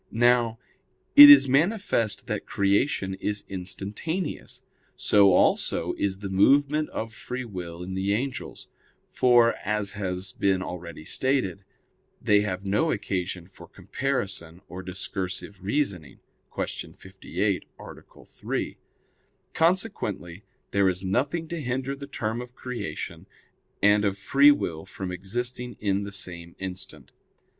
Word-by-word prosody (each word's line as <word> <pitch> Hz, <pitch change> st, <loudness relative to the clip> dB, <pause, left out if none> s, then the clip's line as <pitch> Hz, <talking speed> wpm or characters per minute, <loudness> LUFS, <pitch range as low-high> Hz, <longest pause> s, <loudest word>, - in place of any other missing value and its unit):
Now, 120 Hz, -1 st, +3 dB, 0.6 s
it 145 Hz, 0 st, +13 dB
is 140 Hz, -1 st, +10 dB
manifest 145 Hz, -, +1 dB
that -, -, -4 dB
creation 100 Hz, 0 st, +1 dB
is 105 Hz, 0 st, -2 dB
instantaneous; 100 Hz, -, -4 dB, 0.3 s
so 100 Hz, -2 st, +5 dB
also 90 Hz, -, +2 dB
is 95 Hz, -1 st, -2 dB
the 100 Hz, 0 st, -6 dB
movement 145 Hz, +9 st, +3 dB
of 110 Hz, 0 st, -5 dB
free 125 Hz, +3 st, -5 dB
will 90 Hz, -5 st, -7 dB
in 95 Hz, +1 st, -6 dB
the 95 Hz, +1 st, -1 dB
angels; 130 Hz, +3 st, -5 dB, 0.4 s
for, 120 Hz, -2 st, +5 dB
as 105 Hz, -1 st, -1 dB
has 95 Hz, -2 st, -3 dB
been 95 Hz, -2 st, +1 dB
already 85 Hz, -3 st, -8 dB
stated, 125 Hz, -, 0 dB, 0.6 s
they 105 Hz, -1 st, +3 dB
have 95 Hz, -2 st, -3 dB
no 105 Hz, +12 st, +1 dB
occasion 90 Hz, -, -3 dB
for 95 Hz, -, -15 dB
comparison 100 Hz, -11 st, -3 dB
or 90 Hz, +1 st, -7 dB
discursive 95 Hz, +1 st, -5 dB
reasoning 100 Hz, -, -2 dB, 0.3 s
(Q. -, -, -4 dB
58, 95 Hz, 0 st, -3 dB
A. -, -, -13 dB
3). -, -, -4 dB, 0.8 s
Consequently, 160 Hz, -, -1 dB, 0.3 s
there 100 Hz, -1 st, +3 dB
is 90 Hz, +1 st, -3 dB
nothing 140 Hz, -, -1 dB
to 170 Hz, -2 st, -4 dB
hinder 130 Hz, +1 st, -2 dB
the 140 Hz, 0 st, -9 dB
term 115 Hz, -3 st, -3 dB
of 125 Hz, 0 st, -11 dB
creation 125 Hz, -2 st, -6 dB, 0.6 s
and 105 Hz, +1 st, +5 dB
of 100 Hz, -1 st, 0 dB
free 140 Hz, +8 st, +5 dB
will 80 Hz, -, 0 dB
from 95 Hz, -1 st, -6 dB
existing 120 Hz, +6 st, -4 dB
in 100 Hz, -1 st, 0 dB
the 100 Hz, -, -7 dB
same 85 Hz, -3 st, -5 dB
instant. 95 Hz, 0 st, -7 dB
100 Hz, 125 wpm, -26 LUFS, 95-125 Hz, 0.8 s, it